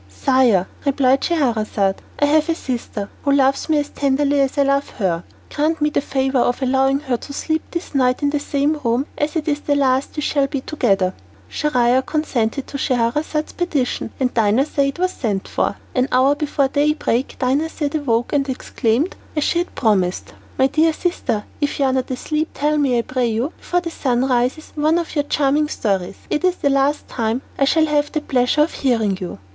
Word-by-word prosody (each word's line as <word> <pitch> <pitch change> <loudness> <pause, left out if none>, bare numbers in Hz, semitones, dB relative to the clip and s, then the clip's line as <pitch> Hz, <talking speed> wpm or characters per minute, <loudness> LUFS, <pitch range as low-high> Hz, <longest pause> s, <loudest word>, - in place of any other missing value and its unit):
"Sire," 220 - +2 0.2
replied 270 -1 +2
Scheherazade, 220 - 0 0.2
"I 290 - +3
have 305 +2 +2
a 330 - +2
sister 235 -7 -4
who 280 - +1
loves 275 +2 +2
me 310 - +3
as 290 0 -1
tenderly 280 +1 +1
as 270 +1 0
I 285 - +5
love 275 0 +1
her. 180 -6 0 0.3
Grant 310 +2 0
me 300 0 +1
the - - +1
favour 265 -1 0
of 245 0 +1
allowing 270 +1 +2
her 260 -5 -1
to 280 - -9
sleep 315 +2 -1
this 340 -2 -5
night 255 0 +2
in 285 - +2
the 295 - 0
same 290 +2 0
room, 240 +3 +1
as 295 +2 -2
it 320 -1 -2
is 295 -1 +1
the 290 -1 0
last 265 -1 +1
we 300 - -3
shall 280 -2 +1
be 275 -1 -3
together." 195 -11 +1 0.3
Schahriar 255 -4 +2
consented 275 -5 -1
to 280 - -6
Scheherazade's 265 +6 0
petition 295 -11 -1
and 255 -2 0
Dinarzade 270 +6 +1
was 365 +1 +1
sent 205 - -3
for. - - -1 0.2
An 255 0 +1
hour 260 +3 +4
before 290 -2 0
daybreak 285 -3 0
Dinarzade 290 +3 0
awoke, 240 -3 0
and 280 -1 +1
exclaimed, 255 +3 -1 0.2
as 300 - +1
she 340 - +1
had 350 - -4
promised, 190 -6 0 0.2
"My 265 - +4
dear 315 +4 +3
sister, 310 - -2 0.2
if 290 - 0
you 280 - +2
are 260 - +2
not 260 -1 -1
asleep, 305 +5 -2
tell 300 +1 +1
me 265 -4 +2
I 235 - +1
pray 255 -1 -1
you, 235 +7 -1
before 355 0 -1
the 335 -1 -5
sun 255 -4 0
rises, 255 +4 0
one 310 +2 +2
of 340 -1 -3
your 290 -2 0
charming 290 +1 +1
stories. 195 -9 -2
It 300 - 0
is 365 -1 +3
the 280 - 0
last 275 +2 +1
time 230 +2 -2
that - - -9
I - - +6
shall 315 +3 +3
have 295 -1 0
the 310 - -1
pleasure 255 +1 +2
of 320 - -3
hearing 225 -7 +1
you." 180 - -5
275 Hz, 200 wpm, -20 LUFS, 245-300 Hz, 0.3 s, I